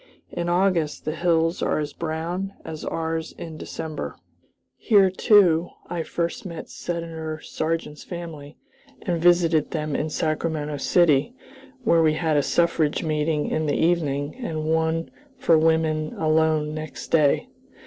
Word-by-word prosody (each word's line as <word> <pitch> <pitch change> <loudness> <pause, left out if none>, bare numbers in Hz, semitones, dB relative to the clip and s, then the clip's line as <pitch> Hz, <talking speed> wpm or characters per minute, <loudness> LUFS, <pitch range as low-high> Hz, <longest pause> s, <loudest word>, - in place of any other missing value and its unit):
In 175 0 -2
August 175 -4 +1
the 155 - -1
hills 165 0 +1
are - - +1
as 150 -1 -3
brown 170 +4 -3
as 155 -1 -6
ours 160 0 -3
in 160 -2 -8
December. 155 0 -6 0.6
Here, 200 -5 +4
too, 180 -4 +4 0.2
I 175 -1 -1
first 170 +1 -3
met 170 -4 -7
Senator 165 -2 -4
Sargent's 155 -2 -3
family, 160 -4 -8 0.5
and 175 -4 -1
visited 170 -3 +4
them 155 -2 -2
in 155 - -1
Sacramento 155 -1 -1
City, 160 - +3 0.5
where 170 -8 +4
we 155 -1 +4
had 160 -1 0
a 145 - +4
suffrage 165 +1 +1
meeting 155 -1 0
in 155 0 -1
the 145 - +1
evening 150 -4 +1
and 160 -10 -3
one 160 +1 0 0.3
for 165 - +4
women 155 -1 +2
alone 155 -1 +2
next 155 0 -7
day. 150 -3 +3
160 Hz, 140 wpm, -24 LUFS, 155-170 Hz, 0.6 s, Here